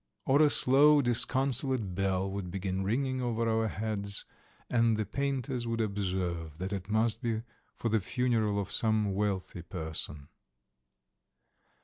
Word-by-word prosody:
or 140 Hz, +3 st, +4 dB
a 150 Hz, -, +6 dB
slow 145 Hz, +2 st, +5 dB
disconsolate 130 Hz, -3 st, +2 dB
bell 95 Hz, 0 st, 0 dB
would 95 Hz, -2 st, -5 dB
begin 95 Hz, +1 st, -3 dB
ringing 130 Hz, +5 st, -1 dB
over 115 Hz, -2 st, -1 dB
our 110 Hz, 0 st, +1 dB
heads, 100 Hz, -1 st, -1 dB, 0.4 s
and 115 Hz, -2 st, +2 dB
the 110 Hz, -, -1 dB
painters 135 Hz, +1 st, -2 dB
would 115 Hz, 0 st, -2 dB
observe 90 Hz, -7 st, -2 dB
that 95 Hz, +3 st, -4 dB
it 95 Hz, 0 st, -5 dB
must 110 Hz, +2 st, +1 dB
be 115 Hz, -2 st, -2 dB, 0.3 s
for 115 Hz, -, -2 dB
the 110 Hz, 0 st, +2 dB
funeral 110 Hz, -1 st, 0 dB
of 100 Hz, -, -4 dB
some 110 Hz, -3 st, +1 dB
wealthy 95 Hz, -3 st, -2 dB
person. 80 Hz, -4 st, -4 dB
110 Hz, 135 wpm, -30 LUFS, 95-120 Hz, 0.4 s, a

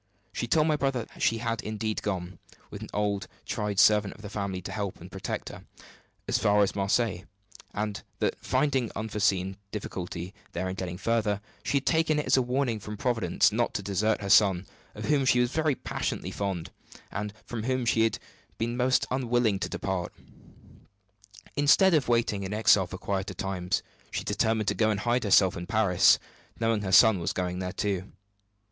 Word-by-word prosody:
She 120 Hz, -, -3 dB
told 155 Hz, +5 st, +3 dB
my 155 Hz, -1 st, +2 dB
brother 135 Hz, -5 st, -1 dB
that -, -, -15 dB
she 115 Hz, -, +3 dB
had 115 Hz, -1 st, -2 dB
indeed 110 Hz, 0 st, -3 dB
gone 90 Hz, -3 st, -4 dB, 0.3 s
(with -, -, -8 dB
an -, -, -7 dB
old, 100 Hz, -2 st, -1 dB, 0.2 s
tried 105 Hz, -3 st, -2 dB
servant 105 Hz, -2 st, +4 dB
of 105 Hz, -, -15 dB
the 105 Hz, -, -7 dB
family 100 Hz, -3 st, -3 dB
to -, -, -6 dB
help 100 Hz, -3 st, -4 dB
and -, -, -11 dB
protect -, -, -4 dB
her) -, -, -10 dB, 0.6 s
as -, -, +1 dB
far 105 Hz, 0 st, +4 dB
as 100 Hz, -, -1 dB
Marseilles; 100 Hz, -2 st, 0 dB, 0.5 s
and 105 Hz, -1 st, -3 dB, 0.2 s
that, -, -, 0 dB
finding 135 Hz, -6 st, +1 dB
unforeseen 100 Hz, -3 st, 0 dB
difficulty 90 Hz, -3 st, -5 dB, 0.2 s
there 95 Hz, +2 st, -2 dB
in 95 Hz, -, -3 dB
getting 90 Hz, -2 st, -5 dB
further, 110 Hz, -1 st, 0 dB, 0.2 s
she 140 Hz, -, +1 dB
had 135 Hz, -, -2 dB
taken 160 Hz, -1 st, +2 dB
it 150 Hz, -, -1 dB
as -, -, +4 dB
a 130 Hz, -, +4 dB
warning 125 Hz, -2 st, 0 dB
from 105 Hz, +1 st, -7 dB
Providence 120 Hz, -2 st, +2 dB
not 120 Hz, +2 st, 0 dB
to 100 Hz, -, -2 dB
desert 105 Hz, +3 st, 0 dB
her 100 Hz, -, -4 dB
son, 95 Hz, -3 st, +5 dB, 0.3 s
of -, -, -6 dB
whom 145 Hz, -2 st, +2 dB
she 130 Hz, -1 st, +4 dB
was 120 Hz, 0 st, +2 dB
very 155 Hz, -2 st, +1 dB
passionately -, -, -3 dB
fond, 95 Hz, -5 st, -3 dB, 0.4 s
and 105 Hz, +1 st, -3 dB
from 115 Hz, -2 st, -5 dB
whom 130 Hz, -1 st, 0 dB
she 115 Hz, -1 st, +2 dB
had 115 Hz, 0 st, +2 dB, 0.4 s
been 115 Hz, +1 st, -2 dB
most 130 Hz, +1 st, +2 dB
unwilling 120 Hz, -5 st, +1 dB
to -, -, -3 dB
depart. 95 Hz, -3 st, -3 dB, 1.4 s
Instead 150 Hz, +6 st, +5 dB
of 150 Hz, -4 st, +3 dB
waiting 115 Hz, -4 st, +1 dB
in 95 Hz, +1 st, -4 dB
exile 105 Hz, -3 st, +4 dB
for 90 Hz, -, -7 dB
quieter 95 Hz, +1 st, -3 dB
times, 90 Hz, -1 st, -2 dB, 0.3 s
she -, -, -3 dB
determined 110 Hz, -1 st, 0 dB
to -, -, +2 dB
go 110 Hz, -1 st, +2 dB
and 105 Hz, -1 st, -1 dB
hide 120 Hz, +2 st, +1 dB
herself 95 Hz, -2 st, +5 dB
in 85 Hz, +1 st, -6 dB
Paris, 100 Hz, -3 st, +4 dB, 0.4 s
knowing 115 Hz, -2 st, +1 dB
her 95 Hz, -2 st, -3 dB
son 100 Hz, 0 st, +7 dB
was 85 Hz, -, -2 dB
going 90 Hz, 0 st, -2 dB
there 90 Hz, -1 st, -3 dB
too. 95 Hz, -1 st, -2 dB
105 Hz, 190 wpm, -28 LUFS, 95-120 Hz, 1.4 s, son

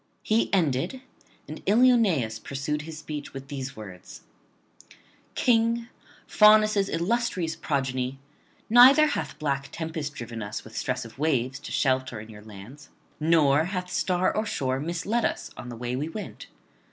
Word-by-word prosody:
He 220 Hz, +1 st, +1 dB
ended; 170 Hz, -, 0 dB, 0.5 s
and -, -, -8 dB
Ilioneus 205 Hz, -, +3 dB
pursued 140 Hz, +5 st, -3 dB
his 160 Hz, +1 st, -8 dB
speech 150 Hz, -2 st, -7 dB
with 135 Hz, 0 st, -8 dB
these 140 Hz, -1 st, -5 dB
words: 95 Hz, -5 st, -11 dB, 1.1 s
'King, 230 Hz, 0 st, +2 dB, 0.4 s
Faunus' 215 Hz, -2 st, +5 dB
illustrious 180 Hz, -2 st, -1 dB
progeny, 130 Hz, -2 st, -2 dB, 0.5 s
neither 255 Hz, +6 st, +8 dB
hath 295 Hz, -, -3 dB
black 140 Hz, -3 st, -2 dB
tempest 160 Hz, -3 st, -5 dB
driven 115 Hz, -2 st, -7 dB
us 105 Hz, 0 st, -5 dB
with 110 Hz, -, -13 dB
stress 125 Hz, -1 st, -2 dB
of 115 Hz, +3 st, -13 dB
waves 135 Hz, -4 st, 0 dB
to 145 Hz, -, -9 dB
shelter 130 Hz, -4 st, 0 dB
in 110 Hz, +1 st, -10 dB
your 105 Hz, -1 st, -12 dB
lands, 110 Hz, +8 st, -12 dB, 0.3 s
nor 155 Hz, -2 st, +3 dB
hath 180 Hz, -1 st, -4 dB
star 185 Hz, 0 st, +1 dB
or 215 Hz, -, +1 dB
shore 130 Hz, -6 st, -1 dB
misled 175 Hz, +9 st, -1 dB
us -, -, -2 dB
on 125 Hz, -, -8 dB
the 120 Hz, -, -7 dB
way 120 Hz, +1 st, -3 dB
we 145 Hz, +5 st, -3 dB
went. 210 Hz, +4 st, -8 dB
150 Hz, 145 wpm, -26 LUFS, 130-195 Hz, 1.1 s, neither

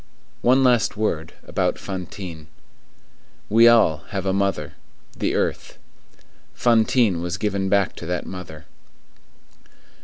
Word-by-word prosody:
One 130 Hz, +2 st, +4 dB
last 120 Hz, -5 st, +2 dB
word 85 Hz, -7 st, -2 dB
about -, -, -1 dB
Fantine. 90 Hz, -4 st, -7 dB, 1.0 s
We 115 Hz, +2 st, +6 dB
all 115 Hz, -10 st, +5 dB
have 100 Hz, -1 st, -4 dB
a 95 Hz, -, +1 dB
mother,—the 95 Hz, -7 st, -3 dB
earth. -, -, -2 dB, 0.8 s
Fantine 115 Hz, -5 st, +2 dB
was 90 Hz, +2 st, -3 dB
given 100 Hz, -2 st, -1 dB
back 100 Hz, -1 st, +1 dB
to 85 Hz, -, -7 dB
that 90 Hz, 0 st, -2 dB
mother. 80 Hz, -4 st, -9 dB
95 Hz, 110 wpm, -22 LUFS, 85-110 Hz, 1.0 s, We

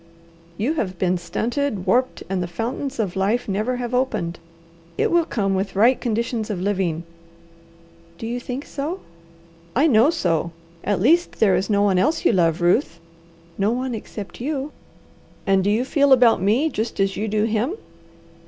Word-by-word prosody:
"You 245 Hz, +9 st, 0 dB
have 190 Hz, -, -3 dB
been 180 Hz, 0 st, +1 dB
stunted, 225 Hz, +4 st, -2 dB
warped, 255 Hz, +1 st, +1 dB
and 190 Hz, -1 st, -1 dB
the 175 Hz, -, -2 dB
fountains 235 Hz, +9 st, -4 dB
of 200 Hz, -5 st, -2 dB
life 205 Hz, +6 st, 0 dB
never 215 Hz, +5 st, -1 dB
have 245 Hz, 0 st, -4 dB
opened. 215 Hz, -10 st, -1 dB, 0.6 s
It -, -, +1 dB
will 340 Hz, -1 st, +3 dB
come 195 Hz, -9 st, -1 dB
with 195 Hz, +1 st, -2 dB
right 235 Hz, +6 st, +4 dB
conditions 230 Hz, -1 st, -2 dB
of 200 Hz, -4 st, -2 dB
living." 185 Hz, -4 st, -1 dB, 1.1 s
"Do 225 Hz, -, -7 dB
you 240 Hz, +2 st, -3 dB
think 250 Hz, +3 st, -5 dB
so?" 310 Hz, +7 st, -4 dB, 0.7 s
"I 275 Hz, +6 st, +4 dB
know 250 Hz, -2 st, +5 dB
so. 170 Hz, -, 0 dB, 0.3 s
At 200 Hz, -1 st, 0 dB
least 330 Hz, -, +2 dB
there 200 Hz, -4 st, +4 dB
is 190 Hz, +4 st, -1 dB
no 205 Hz, -1 st, +3 dB
one 195 Hz, -3 st, +3 dB
else 305 Hz, -, +1 dB
you -, -, +6 dB
love, 170 Hz, -3 st, +2 dB
Ruth?" 175 Hz, -, +2 dB, 0.6 s
"No 200 Hz, +2 st, +2 dB
one 250 Hz, +2 st, -2 dB
except 210 Hz, -1 st, -7 dB
you." 285 Hz, +1 st, -3 dB, 0.7 s
"And 195 Hz, -1 st, +3 dB
do 200 Hz, -, +1 dB
you 225 Hz, +5 st, +1 dB
feel 280 Hz, 0 st, +2 dB
about 240 Hz, -6 st, +5 dB
me 225 Hz, +11 st, +2 dB
just 225 Hz, -3 st, -3 dB
as 195 Hz, 0 st, +1 dB
you 215 Hz, -, -2 dB
do 210 Hz, 0 st, +1 dB
him?" 225 Hz, -, 0 dB
220 Hz, 170 wpm, -22 LUFS, 190-255 Hz, 1.1 s, you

